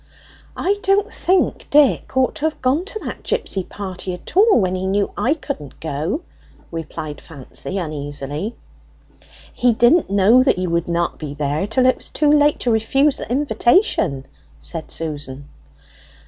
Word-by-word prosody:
"I 405 +2 0
don't 400 +2 +1
think 370 +1 0
Dick 285 -2 +3
ought 260 -1 +3
to 305 - -2
have 315 - -1
gone 270 +7 +1
to 420 - -4
that - - -5
gipsy 190 - -1
party 185 -1 -6
at 180 - -12
all 415 - +6
when 185 -3 +1
he 185 0 -2
knew 200 +1 0
I 280 +5 +1
couldn't 280 - -7
go," 160 - -2 0.5
replied 155 -2 -6
Fancy 160 +5 -7
uneasily. 150 - -4 1.0
"He 245 -1 +3
didn't 240 - +4
know 200 +5 +5
that 260 - +3
you 180 -1 -2
would 170 0 0
not 170 0 -1
be 145 -2 -6
there 150 +5 -1
till 255 +4 +2
it 255 - +4
was - - -6
too 300 -1 +2
late 295 0 +4
to 245 - +1
refuse 270 +6 +2
the - - -7
invitation," 240 - +2 0.3
said 70 - -5
Susan. 145 -3 -5
200 Hz, 160 wpm, -20 LUFS, -, 1.0 s, all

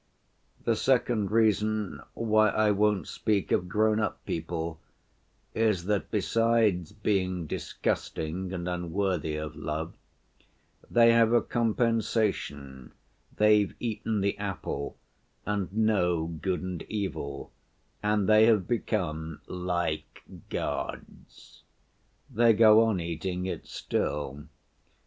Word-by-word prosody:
The 115 - +2
second 120 -4 +1
reason 110 -1 +1
why 110 -1 +3
I 110 +1 +2
won't 105 0 +1
speak 105 -3 -1
of 90 - +2
grown‐up 110 +3 +1
people 80 0 -4 0.7
is 110 -6 +1
that, 105 0 -1
besides 110 -5 +1
being 95 -4 -1
disgusting 85 +4 -3
and 90 -2 -4
unworthy 90 -2 -1
of 75 0 -5
love, 80 +2 -4 1.0
they 115 0 +6
have 115 0 +4
a 120 - +5
compensation—they've 105 - 0
eaten 110 -2 -2
the 100 0 +1
apple 95 -7 -4 0.5
and 100 -3 -2
know 95 -6 +1
good 85 +3 -3
and 90 -2 -4
evil, 95 -9 -4 0.5
and 105 -2 +1
they 110 +1 +6
have 105 -6 +3
become 80 -9 -2
'like 85 -3 -3 0.3
gods.' - - -6 0.7
They 120 -3 +4
go 110 +1 +7
on 110 -5 0
eating 90 +2 -3
it 95 - -5
still. 75 -1 -3
100 Hz, 105 wpm, -28 LUFS, 85-110 Hz, 1.0 s, go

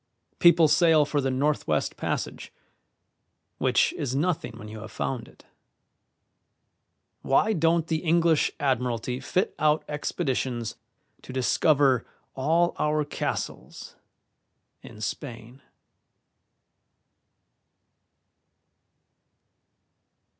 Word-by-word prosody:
People 170 -2 +6
sail 160 -1 +4
for 145 0 -1
the 135 - 0
Northwest 140 +3 0
Passage, - - -4 1.1
which - - +2
is 130 -2 -3
nothing 155 -5 -1
when 105 - -10
you 110 +1 -8
have 110 +1 -9
found 125 -4 -3
it. - - -20 1.8
Why 210 +11 +2
don't 165 -2 +2
the 160 -1 -1
English 165 -1 +2
Admiralty 125 -2 -1
fit 185 +7 -1
out 155 0 +2
expeditions 130 -6 -2 0.5
to - - -10
discover 130 0 +2 0.3
all 165 +6 +2
our 150 0 +1
castles 145 - -5 0.9
in 110 - -12
Spain?" 120 +1 -6
145 Hz, 85 wpm, -26 LUFS, 125-160 Hz, 1.8 s, People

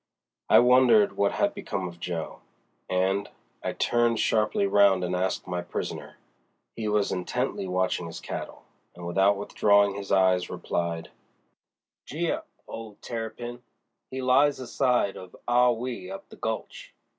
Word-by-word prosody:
I - - +7
wondered 130 - +5
what 100 - +1
had - - +1
become 95 -2 -4
of 85 -1 -11
Jo., 85 -2 -5 0.5
and—I 95 +2 -2
turned 120 -1 +1
sharply 105 -2 +2
round 100 -2 +4
and 90 0 -1
asked 95 +1 -1
my 90 -1 -3
prisoner. 85 - -6 0.6
He 110 -2 -3
was 105 -1 +1
intently 90 +1 -2
watching 90 -1 0
his 85 - -7
cattle, - - -7 0.3
and 90 0 -9
without 95 +3 +3
withdrawing 100 0 +3
his 100 0 -7
eyes 95 -2 +3
replied: 85 -1 -3 1.0
"Gee - - -1
up, - - -4 0.2
old 110 -2 -9
Terrapin! 120 +1 -5 0.5
He 130 0 -5
lies 135 +3 +4
aside 125 -4 +1
of 95 -1 -11
Ah 125 +1 +5
Wee 125 +8 -3
up 195 0 -8
the - - -12
gulch. 110 0 -5
100 Hz, 140 wpm, -27 LUFS, 90-120 Hz, 1.0 s, I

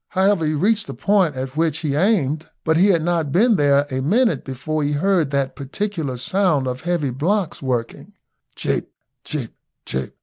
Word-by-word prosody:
However, 190 -4 +2
he 155 - 0
reached 210 +8 +1
the - - -7
point 195 -8 +2
as 130 +1 -3
which 160 -1 +1
he 150 -4 -1
aimed, 160 -4 +1
but 160 - +2
he 180 +5 +5
had 170 -5 +3
not 165 -4 0
been 220 - +4
there 145 -3 +3
a 130 0 -1
minute 195 - +2
before 145 +4 -3
he 145 0 0
heard 170 0 +2
that 140 -1 -1
peculiar 150 -1 -3
sound 160 +1 +1
of 125 0 -4
heavy 170 -6 -1
blocks 175 - -1
working, 125 -4 -3 0.4
cheep, - - -2 0.3
cheep, 135 -7 -5 0.3
cheep. 65 - -4
155 Hz, 175 wpm, -21 LUFS, 140-190 Hz, 0.4 s, he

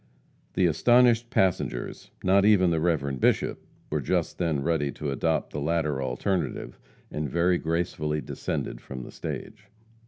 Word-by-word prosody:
The 95 - +3
astonished 120 +7 +4
passengers 95 - -1
not 95 +1 +4
even 100 -4 +5
the 80 - +1
Reverend 70 -6 0
Bishop - - +1 0.3
were - - 0
just - - -1
then 80 -6 0
ready 75 -4 +1
to 75 -2 -4
adopt 80 +4 0
the 75 - -3
latter 75 -3 0
alternative, 85 +9 -2 0.3
and 75 -1 -3
very 85 +4 +2
gracefully 80 -2 -1
descended - - -4
from 65 -2 -7
the - - -10
stage. - - -7
80 Hz, 145 wpm, -27 LUFS, 75-90 Hz, 0.3 s, even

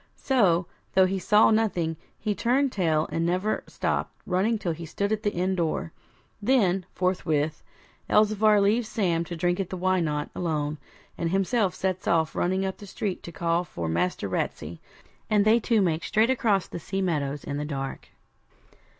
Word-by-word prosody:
So, 195 -10 +2 0.3
though 190 0 +6
he 190 +1 -1
saw 210 +5 +5
nothing, 185 -7 +1 0.2
he 215 -1 -1
turned 255 +6 +1
tail 160 -6 +1
and 165 - -1
never 185 +5 0
stopped - - -2
running 195 +5 +1
till 190 -5 -2
he 165 +1 -6
stood 200 +6 -2
at 215 -1 0
the 205 -2 0
inn 185 +1 0
door. 165 -2 -1 0.5
Then, 195 -6 +2
forthwith, 160 -5 0 0.5
Elzevir 215 0 +4
leaves 215 +3 +2
Sam 170 -6 0
to 170 - -6
drink 175 +2 0
at 190 -2 -2
the 185 - -4
Why 185 +1 +2
Not? 150 -3 -2
alone, 150 -3 -2 0.4
and 170 - 0
himself 195 +1 +1
sets 185 -1 -2
off 160 -2 +2
running 190 +2 0
up 190 - -3
the 205 - -11
street 195 -1 -3
to 170 - -9
call 170 +1 0
for 85 - -5
Master 85 +3 -1
Ratsey; 80 +2 -3 0.5
and 210 -1 +3
they 220 +2 +5
two 230 -1 +2
make 165 -2 0
straight 225 +3 +2
across 210 -7 +2
the - - -6
sea 195 +3 -3
meadows 145 -5 -1
in 145 - -4
the 145 - -2
dark. 135 -2 -5
185 Hz, 175 wpm, -26 LUFS, 165-210 Hz, 0.5 s, though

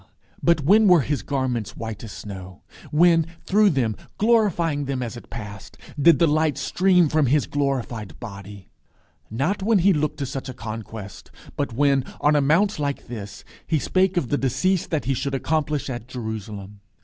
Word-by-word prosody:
but 170 -2 +3
when 205 +9 +5
were 180 -4 +6
his 140 +2 -2
garments 130 -6 -2
white 110 -2 -6
as 110 - -7
snow? 95 -3 -9 0.3
When, 165 +1 +4 0.2
through 210 +1 +4
them, 125 - 0 0.2
glorifying 185 -10 +2
them 130 -2 -2
as 120 0 -5
it 120 - -11
passed, 105 -3 -9 0.2
did 165 +4 +7
the 170 - +4
light 155 -2 +1
stream 180 -2 +3
from 155 -1 +2
his 145 +3 +2
glorified 130 -7 -3
body? 100 -3 -10 0.6
Not 140 - -1
when 215 +2 +3
he 190 +2 +4
looked 150 -2 -1
to 140 - -2
such 135 0 -5
a 130 - -7
conquest; 110 -4 -8 0.3
but 140 -3 -2
when, 140 +1 +2 0.2
on 150 +1 +3
a 145 - +4
mount 165 +7 +2
like 140 -4 -3
this, 100 -4 -7 0.2
he 160 - +2
"spake 185 +6 +1
of 140 -9 0
the 145 - +1
decease 180 +8 +1
that 155 -3 -2
he 135 - +1
should 135 +2 -2
accomplish 150 +1 -1
at 120 -3 -5
Jerusalem"! 105 -5 -6
140 Hz, 175 wpm, -23 LUFS, 115-165 Hz, 0.6 s, did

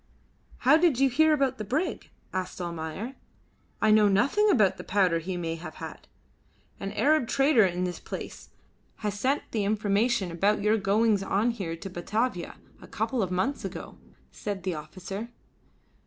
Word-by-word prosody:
"How 275 +4 +5
did 325 -6 +3
you 270 0 +4
hear 315 +5 +4
about 270 -4 +1
the - - -2
brig?" 275 - -2 0.2
asked 185 0 -3
Almayer. 170 +7 -5 0.7
"I 215 - +5
know 215 -1 +6
nothing 275 - +3
about 215 - +4
the - - -7
powder 185 -4 +2
he 180 +2 -4
may 165 -2 -2
have 160 -1 -9
had." - - -9 0.7
"An 195 - -4
Arab 270 +4 +3
trader 270 -7 +4
of 180 0 -2
this 180 -1 -4
place - - -8 0.6
has 205 -1 -2
sent 270 +5 +1
the 215 -3 0
information 210 0 +1
about 200 +5 +1
your 215 +1 +3
goings 205 +1 +2
on 200 +4 +1
here 190 -8 -4
to 165 - -8
Batavia, 190 +2 -2 0.3
a - - -12
couple 225 +3 -1
of 190 - -1
months 190 +11 -1
ago," - - -7 0.3
said 200 -3 -5
the 185 -1 -1
officer. 185 +8 -7
205 Hz, 165 wpm, -27 LUFS, 185-245 Hz, 0.7 s, know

